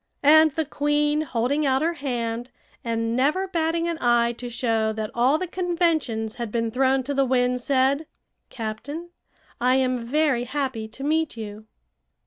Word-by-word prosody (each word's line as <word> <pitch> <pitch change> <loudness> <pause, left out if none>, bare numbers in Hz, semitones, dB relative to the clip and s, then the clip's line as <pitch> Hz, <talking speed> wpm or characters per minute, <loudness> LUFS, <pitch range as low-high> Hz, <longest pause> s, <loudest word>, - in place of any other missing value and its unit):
And 315 +2 +7
the 320 0 -1
queen, 295 +1 +1
holding 265 +1 0
out 270 0 +2
her 335 +1 +1
hand, 245 -5 -3 0.3
and 230 0 -1
never 300 +10 +1
batting 330 -1 0
an 335 -1 -3
eye 240 -1 +3
to 245 +1 -7
show 225 -2 0
that 215 -1 -4
all 255 +5 +3
the 370 - -3
conventions 330 -12 -1
had 235 -3 -4
been 230 0 -1
thrown 265 +2 +2
to 285 +3 -3
the 275 0 +2
winds, 250 -1 +1
said: 275 +3 +2 0.4
"Captain, 260 +9 -6 0.5
I 250 +1 +3
am 255 -1 +1
very 265 -1 +1
happy 260 -4 -3
to 270 +5 -10
meet 315 -2 0
you." 215 -1 -7
260 Hz, 160 wpm, -24 LUFS, 235-305 Hz, 0.5 s, And